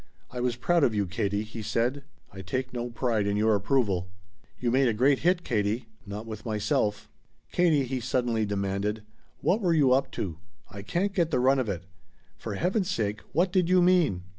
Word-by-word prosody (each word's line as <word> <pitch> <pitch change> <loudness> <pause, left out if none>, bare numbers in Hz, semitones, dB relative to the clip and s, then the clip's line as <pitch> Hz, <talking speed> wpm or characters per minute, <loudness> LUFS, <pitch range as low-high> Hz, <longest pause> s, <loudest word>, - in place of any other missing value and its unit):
"I 125 - -5
was 125 -1 0
proud 170 +6 +2
of 115 - +2
you, 100 -1 +1
Katie," 100 +2 -1
he 110 +1 -8
said. 120 +6 -1 0.3
"I 95 - -8
take 130 +8 -3
no 120 0 -3
pride 115 -3 0
in 100 0 0
your 110 +1 +3
approval!" 100 -4 +1 0.5
"You 120 -2 0
made 130 +1 +3
a 115 - +1
great 135 +4 +3
hit, 175 +1 +2
Katie." 110 -1 -1 0.2
"Not 105 +3 -6
with 110 -2 -7
myself." 105 -1 -1 0.4
"Katie," 165 -5 +3
he 130 0 -3
suddenly 120 -2 0
demanded, 100 +1 -2 0.4
"what 210 +5 +2
were 175 -4 +2
you 140 -5 +4
up 135 +2 +2
to? 85 -5 -4 0.3
I 100 - -7
can't 180 - -1
get 170 -5 +1
the 125 - +1
run 135 +2 +4
of 125 -4 -1
it. 90 -3 -3 0.6
For 105 -3 -5
heaven's 185 - 0
sake, 105 - -1
what 175 +3 +2
did 180 -3 +2
you 185 0 +5
mean?" 175 - +3
120 Hz, 195 wpm, -27 LUFS, 105-140 Hz, 0.6 s, you